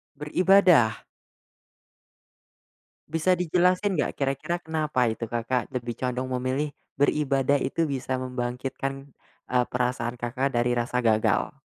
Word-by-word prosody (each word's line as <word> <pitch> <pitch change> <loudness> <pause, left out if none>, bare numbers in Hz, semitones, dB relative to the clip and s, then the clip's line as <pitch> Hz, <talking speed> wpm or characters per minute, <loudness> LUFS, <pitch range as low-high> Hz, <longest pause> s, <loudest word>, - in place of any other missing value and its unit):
Beribadah? 165 - +4 2.1
Bisa 165 +3 +2
dijelasin, 180 +1 +1
nggak, - - -1
kira-kira 140 +5 -1
kenapa 155 -5 0
itu, 115 +1 -5
Kakak 120 +2 -1
lebih 120 -1 -3
condong 125 0 -2
memilih, 135 +4 -1 0.2
beribadah 140 -1 +2
itu 165 - -1
bisa 135 -3 -2
membangkitkan, 130 +2 -4 0.4
eee, 125 -1 +3
perasaan 125 -1 -1
Kakak 125 +2 -2
dari 120 +1 +2
rasa 120 +1 -1
gagal? 110 -1 +2
130 Hz, 110 wpm, -26 LUFS, 125-150 Hz, 2.1 s, Beribadah